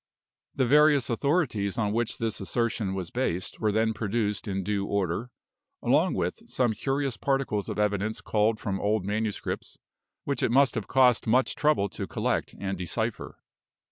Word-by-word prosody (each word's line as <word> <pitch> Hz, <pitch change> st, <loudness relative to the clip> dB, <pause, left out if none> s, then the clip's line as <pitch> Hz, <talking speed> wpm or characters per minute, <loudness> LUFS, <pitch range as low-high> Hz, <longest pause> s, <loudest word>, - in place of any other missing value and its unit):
The 130 Hz, -, +2 dB
various 145 Hz, -1 st, +4 dB
authorities 120 Hz, -, 0 dB
on 105 Hz, -2 st, 0 dB
which 115 Hz, 0 st, -1 dB
this 115 Hz, -3 st, -2 dB
assertion 105 Hz, -1 st, -1 dB
was 90 Hz, -3 st, -4 dB
based 95 Hz, -8 st, -2 dB
were 110 Hz, -1 st, +1 dB
then 110 Hz, +1 st, +1 dB
produced 105 Hz, 0 st, -2 dB
in 95 Hz, -1 st, -2 dB
due 100 Hz, 0 st, -1 dB
order; 100 Hz, +4 st, -1 dB, 0.5 s
along -, -, +3 dB
with -, -, -3 dB
some 120 Hz, -3 st, +1 dB
curious 135 Hz, 0 st, -1 dB
particles 135 Hz, -7 st, -1 dB
of -, -, -4 dB
evidence 105 Hz, +1 st, 0 dB
culled 110 Hz, 0 st, +1 dB
from 95 Hz, -2 st, -3 dB
old 105 Hz, -2 st, +1 dB
manuscripts, 105 Hz, +1 st, -3 dB, 0.5 s
which -, -, -2 dB
it -, -, +2 dB
must 135 Hz, +3 st, +4 dB
have -, -, -4 dB
cost 125 Hz, -3 st, +4 dB
much 125 Hz, +2 st, +3 dB
trouble 150 Hz, -9 st, +2 dB
to -, -, -5 dB
collect -, -, -1 dB
and 95 Hz, -2 st, -3 dB
decipher. 110 Hz, +6 st, -3 dB
110 Hz, 160 wpm, -27 LUFS, 100-125 Hz, 0.5 s, various